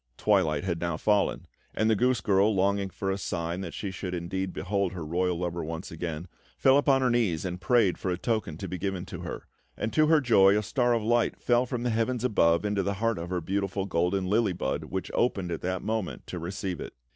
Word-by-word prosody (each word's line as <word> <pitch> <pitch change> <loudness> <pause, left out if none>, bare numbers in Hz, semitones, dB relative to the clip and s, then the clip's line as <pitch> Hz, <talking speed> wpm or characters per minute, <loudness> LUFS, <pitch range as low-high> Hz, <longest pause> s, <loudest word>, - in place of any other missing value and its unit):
Twilight 75 0 +2
had 85 -3 -2
now 85 -2 -1
fallen; 105 +2 +1 0.3
and 110 - +2
the 110 - +4
goose 125 0 +2
girl, 100 +2 +3
longing 100 +1 +1
for 95 +1 -3
a 95 - -2
sign 85 0 -3
that 85 -6 -6
she 100 +3 -4
should 90 -1 -4
indeed 95 +2 -3
behold 100 0 -1
her 85 -4 -5
royal 90 +2 0
lover 85 -1 -3
once 80 +3 -6
again, 80 0 -5 0.3
fell 135 +1 +5
upon 135 -2 +3
her 125 - +3
knees 105 -9 +1
and 90 0 -4
prayed 100 -4 +3
for 95 - -2
a 90 - 0
token 105 -6 -2
to - - -5
be 90 - -5
given 95 -2 -3
to - - -8
her; - - -6 0.3
and, 110 - -3
to 155 -1 +4
her 160 0 +5
joy, 105 -7 +5
a 105 - 0
star 120 +3 +1
of 115 - -1
light 120 +1 +1
fell 120 +1 +2
from 120 -2 -3
the 125 - 0
heavens 115 +2 0
above 85 -7 +3
into 105 -1 +1
the 100 +1 -1
heart 115 -2 0
of 85 +1 -5
her 90 -1 -1
beautiful 95 +2 -2
golden 90 +1 0
lily 105 +1 +2
bud, 80 -2 -2
which 95 +2 -4
opened 100 -7 0
at 85 - -3
that 95 0 -2
moment 110 -4 -3
to 90 - -6
receive 90 0 -4
it. - - -7
95 Hz, 230 wpm, -28 LUFS, 85-110 Hz, 0.3 s, fell